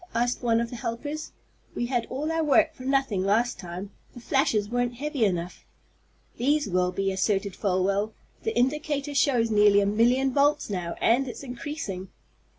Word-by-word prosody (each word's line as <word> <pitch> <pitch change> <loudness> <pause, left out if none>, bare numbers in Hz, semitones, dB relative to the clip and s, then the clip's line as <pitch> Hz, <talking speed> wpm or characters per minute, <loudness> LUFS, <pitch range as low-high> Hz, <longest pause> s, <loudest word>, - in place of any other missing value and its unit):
asked 240 +1 0
one 230 -2 +2
of 235 0 -2
the - - -5
helpers. 290 +7 -5 0.4
"We 240 - -1
had 240 -1 -1
all 295 +5 -3
our 325 0 0
work 315 +2 +4
for 260 - -15
nothing 270 -8 +1
last 220 +5 +1
time. 180 +2 -7 0.2
The - - -8
flashes 240 -4 +1
weren't 245 +1 -1
heavy 285 -1 -2
enough." 175 -2 -3 0.7
"These 290 +4 +1
will 180 -1 +1
be," 195 +1 -1
asserted 195 0 0
Folwell. 200 +2 0 0.3
"The 445 - -2
indicator 290 +2 0
shows 250 -4 +2
nearly 205 -1 +5
a 200 - +2
million 245 +6 +2
volts 285 -5 +2
now, 175 -3 -3
and 250 +4 +3
it's 245 - -7
increasing." 245 -7 -5
240 Hz, 165 wpm, -26 LUFS, 200-275 Hz, 0.7 s, nearly